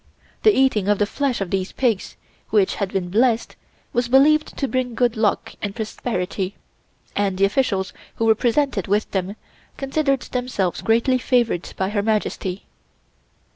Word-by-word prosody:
The 435 - +6
eating 260 -7 +3
of 205 0 +3
the 205 - +2
flesh 255 +1 -1
of 190 - -3
these 190 0 -1
pigs, 230 -7 -1 0.3
which 205 -3 +3
had 200 -2 -2
been 180 -2 -2
blessed, 230 +2 +2 0.4
was 240 0 +1
believed 295 +5 +4
to 275 - 0
bring 255 -2 -2
good 245 -1 +2
luck 220 -2 0
and 205 -1 -4
prosperity, 200 -4 -3 0.6
and 200 -2 0
the 195 - +4
officials 195 -4 0 0.2
who 225 - 0
were 220 - +6
presented 240 - 0
with 205 +2 0
them 190 +1 -2 0.4
considered 275 -1 0
themselves 245 -8 -2
greatly 235 +3 +2
favored 235 -7 +1
by 190 0 0
Her 205 0 0
Majesty. 205 -3 -2
220 Hz, 155 wpm, -22 LUFS, 195-255 Hz, 0.6 s, The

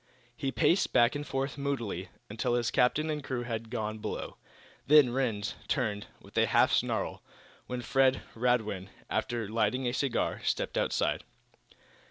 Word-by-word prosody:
He 135 +1 -2
paced 175 +7 +2
back 120 +1 +5
and 145 0 -4
forth, 135 +1 -2
moodily, 140 -7 -2 0.2
until 120 - -1
his 120 -2 0
captain 155 +5 +2
and 150 -1 -3
crew 125 -2 -3
had 115 -1 -4
gone 110 -2 -3
below. - - -5 0.5
Then 145 -4 +7
Rhinds 115 -5 -1
turned, 105 -6 -1
with - - -17
a - - +4
half - - +4
snarl, - - 0 0.5
when 125 -1 -4
Fred 135 0 +3
Radwin, 110 -5 0 0.2
after 120 -3 -1
lighting 120 +4 0
a 120 - 0
cigar, 135 -2 0
stepped - - -1
outside. - - 0
125 Hz, 150 wpm, -30 LUFS, 115-135 Hz, 0.5 s, Then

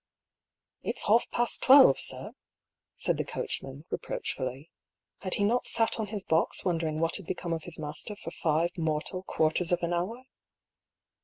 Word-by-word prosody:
"It's - - -2
half 230 +3 +3
past 240 0 +2
twelve, 265 - +7
sir," - - +2 0.6
said - - 0
the - - -1
coachman, 135 +3 -6
re - - -2
proachfully. 130 +4 -5 0.5
Had 185 - 0
he 205 - 0
not 235 +5 +1
sat 225 0 +4
on 215 - -2
his 205 -1 -4
box 160 -2 +1
wondering 165 -3 -1
what 165 0 +2
had 195 -5 -11
become 170 -1 -3
of 165 -1 -5
his 170 -2 -8
master 155 +7 -5
for 165 -5 -9
five 165 +1 -1
mortal 160 +3 -2
quarters 165 -1 -1
of 175 0 0
an 170 +1 -1
hour? 205 +9 -3
170 Hz, 165 wpm, -28 LUFS, 155-205 Hz, 0.6 s, twelve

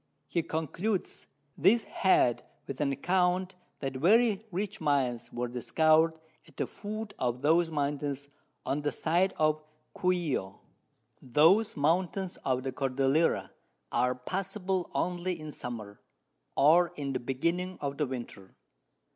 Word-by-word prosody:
He 170 - 0
concludes 170 +6 -3 0.3
this 205 +9 +4
Head 125 -10 +2 0.2
with 140 +1 -5
an 140 -2 +1
Account 180 +5 +1 0.3
that 135 -2 -3
very 215 - +3
rich 200 +3 -3
Mines 125 -5 0
were 120 +1 -2
discover'd 155 +7 +3 0.3
at - - -21
the - - 0
Foot 215 0 -6
of 125 0 -1
those 165 +3 +4
Mountains 145 -2 -2 0.4
on 145 +2 -1
the 145 - 0
side 175 +4 +1
of 155 0 +2 0.3
Cuio. 170 - 0 0.7
Those 165 - +4
Mountains 180 +5 0
of 130 -1 0
the 135 - -2
Cordillera 135 +4 +1 0.4
are 125 +1 +2
passable 190 +6 -2
only 180 0 -1
in 155 -1 -7
Summer, 110 -7 -7 0.5
or 170 +5 +5
in 140 -3 -3
the 130 - -1
Beginning 170 +9 -2
of 140 -1 -3
the 150 - +1
Winter. 120 -7 -8
155 Hz, 130 wpm, -30 LUFS, 135-180 Hz, 0.7 s, or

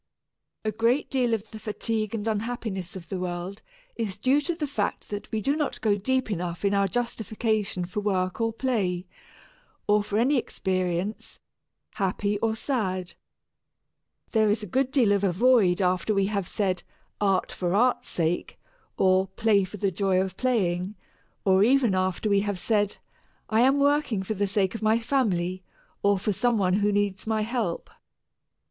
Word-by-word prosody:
A 215 - +1
great 230 +6 +1
deal 250 -3 +1
of 220 -1 -2
the 220 - -8
fatigue 215 0 -2
and 220 0 -3
unhappiness 215 -4 -3
of 175 -3 -8
the 190 - -3
world 180 +2 -4 0.3
is 210 -5 -3
due 265 +7 +3
to 335 +3 -2
the 315 -2 -2
fact 225 -8 -3
that 205 0 -6
we 220 - -1
do 275 +6 +1
not 300 -2 -2
go 210 -2 +3
deep 255 +3 0
enough 175 0 -3
in 200 - +2
our 200 0 +3
justification 220 -3 -1
for 180 +4 -4
work 190 -1 -1
or 225 0 +1
play, 205 -8 -1 0.8
or 210 0 +4
for 205 0 -2
any 260 +5 +3
experience, 185 -3 -2 0.5
happy 200 +1 -1
or 220 0 0
sad. 190 -8 -2 1.2
There 220 -2 +3
is 210 +1 +1
a - - -3
good 260 +7 0
deal 255 -6 +3
of 200 -1 +2
a 195 - +3
void 200 -3 +4
after 185 +3 +1
we 195 0 +3
have 200 -3 -2
said, 185 -2 -1 0.4
"Art 195 -2 +2
for 180 0 -1
art's 245 +4 +2
sake," 170 0 -1 0.4
or 190 0 +3
"Play 205 0 +2
for 200 +3 -9
the 195 0 0
joy 190 0 +1
of 190 0 -2
playing," 195 -6 0 0.5
or 190 0 +5
even 245 -2 +4
after 185 +2 0
we 200 -1 +4
have 205 -1 -2
said, 205 +1 +1 0.5
"I 220 +1 +4
am 265 +3 +4
working 285 -8 +2
for 205 - -2
the 205 0 0
sake 195 -1 +1
of 225 - -6
my 220 +1 +3
family, 190 -8 0 0.4
or 200 0 +3
for 205 +2 -1
some 240 +3 +2
one 185 -3 +2
who 205 0 +3
needs 205 -1 -1
my 220 -1 +1
help." 225 -6 -2
205 Hz, 175 wpm, -26 LUFS, 190-230 Hz, 1.2 s, or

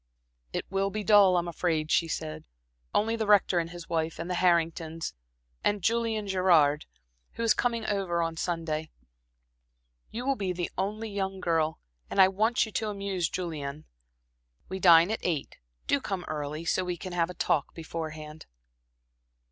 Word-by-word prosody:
"It - - -3
will 195 0 +1
be 210 +1 -4
dull, 200 -3 +6
I'm 175 0 0
afraid," 160 -2 -1
she 165 - +3
said. 80 - -4 0.5
"Only 225 +2 +1
the 220 -2 -2
Rector 200 -3 +4
and 165 0 -2
his 175 -1 -9
wife, 160 -1 -1
and 170 +2 -4
the 180 - -1
Hartingtons, 165 -2 +1 0.5
and 205 -3 +1
Julian 225 0 0
Gerard, 170 -6 +3 0.5
who 230 - -4
is 230 - +5
coming 235 -2 -1
up - - 0
over 175 -4 0
Sunday. 160 -2 -2 1.2
You 240 +3 -5
will 275 0 +2
be 195 -5 -2
the 175 -1 -3
only 210 +3 -3
young 195 -1 -3
girl, 160 -3 +1 0.3
and - - -2
I 190 0 +8
want 220 +6 +2
you 220 - -9
to 215 +1 -1
amuse 195 -4 -2
Julian. 155 -5 -5 0.8
We 190 +1 -4
dine 170 +1 +7
at 220 - -1
eight. 160 -6 -2 0.3
Do 280 - +2
come 195 -7 -3
early, 150 +1 -4
so 185 - +1
we 180 -1 -3
can 185 +2 -7
have 170 -1 +1
a 180 - -7
talk 150 -4 0
beforehand." 160 -2 -7
180 Hz, 165 wpm, -28 LUFS, 165-200 Hz, 1.2 s, I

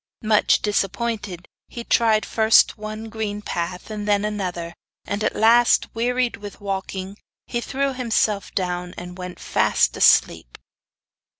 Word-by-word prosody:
Much 215 -1 +3
disappointed, 205 -2 -2 0.2
he 235 - -8
tried 225 -2 +2
first 220 0 +4
one 215 +1 -7
green 215 -2 -4
path 180 0 -5
and 210 -1 -5
then 205 0 +2
another, 180 -5 -4 0.3
and 205 +1 -3
at - - 0
last, 235 +2 +4
wearied 245 +1 0
with 205 0 -10
walking, 195 -1 -5 0.3
he 240 - -3
threw 275 +2 -2
himself 225 -5 0
down 180 -1 -3
and 180 +1 -9
went 180 0 -7
fast - - +1
asleep. - - +3
210 Hz, 130 wpm, -22 LUFS, 190-225 Hz, 0.3 s, first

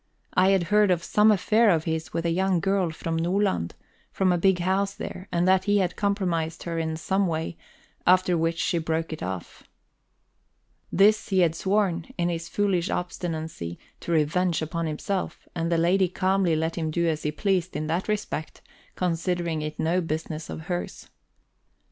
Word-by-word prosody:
I 185 +1 +4
had 195 -2 +3
heard 210 -1 +5
of 175 -2 +1
some 210 +4 +4
affair 215 +2 +4
of 165 -4 +3
his 160 -1 -3
with 165 - -2
a 170 - +2
young 185 +1 +2
girl 195 0 +1
from 165 +1 -4
Nordland, 165 - 0 0.4
from 190 -1 +2
a 175 - +2
big 190 +1 +4
house 195 +3 0
there, 200 -3 -7
and 175 0 +1
that 190 0 +4
he 205 0 +3
had 185 -3 0
compromised 175 -6 -1
her 170 -1 -3
in 160 -1 -2
some 190 +4 +1
way, 165 0 -2 0.5
after 180 0 +5
which 165 0 0
she 170 - 0
broke 160 0 -2
it 155 - -7
off. 90 -1 -5 1.3
This 210 +4 +4
he 190 -2 +3
had 165 -2 +3
sworn, 190 -2 0
in 175 -1 +1
his 165 -1 -4
foolish 195 -4 0
obstinacy, 160 - -4 0.2
to - - -5
revenge 165 +2 +1
upon 165 +1 -2
himself, 180 +5 -3
and 170 0 -2
the 170 - +3
lady 180 +3 +3
calmly 185 -1 +1
let 160 +2 -1
him 160 -1 -1
do 170 +2 0
as 155 -1 0
he 150 - -1
pleased 185 +1 0
in 150 +1 -2
that 165 +4 -1
respect, 210 -7 -3 0.3
considering 170 -2 -1
it 150 0 -5
no 175 +3 +1
business 155 -1 -4
of - - -6
hers. 175 +2 -5
175 Hz, 180 wpm, -26 LUFS, 160-190 Hz, 1.3 s, heard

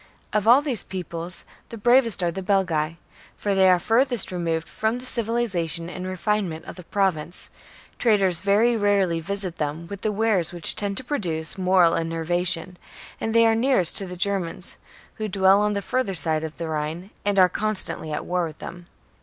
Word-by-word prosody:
Of 210 0 0
all 255 +5 +6
these 255 - +2
peoples 175 -1 -6 0.2
the 230 - -8
bravest 235 -3 +3
are 170 - +1
the 190 - -5
Belgae; 175 -5 0 0.4
for 205 - -1
they 190 -1 +4
are 180 - +5
furthest 230 +1 +2
removed 165 -2 -2
from 220 +2 -2
the 250 - -9
civilization 205 -9 -1
and 185 0 -6
refinement 185 -2 -2
of - - -9
the 180 - -10
Pro 195 0 +2
vince, 160 +2 -4 0.5
traders 195 -7 +3
very 210 +5 +3
rarely 200 -5 +1
visit 190 0 -3
them 150 +2 -3
with 200 -1 -7
the 215 - -1
wares 205 -5 +1
which 175 -2 -1
tend 200 -1 -3
to - - 0
produce 170 - -2
moral 185 -3 +3
enervation, 175 +2 0 0.4
and 225 0 -3
they 230 0 +6
are 225 - +4
nearest 225 -7 +4
to 195 - -3
the 180 0 -8
Germans, 185 -2 -1 0.4
who 215 - -3
dwell 195 0 +4
on 210 0 +1
the 200 -1 -3
further 240 -6 -1
side 155 0 +1
of 160 -1 -7
the 170 - -4
Rhine, 160 +5 -4
and 205 -1 0
are 185 -1 +7
constantly 205 -5 -1
at 150 - -4
war 180 -1 -1
with 155 - -11
them. 175 0 -10
190 Hz, 185 wpm, -23 LUFS, 170-210 Hz, 0.5 s, are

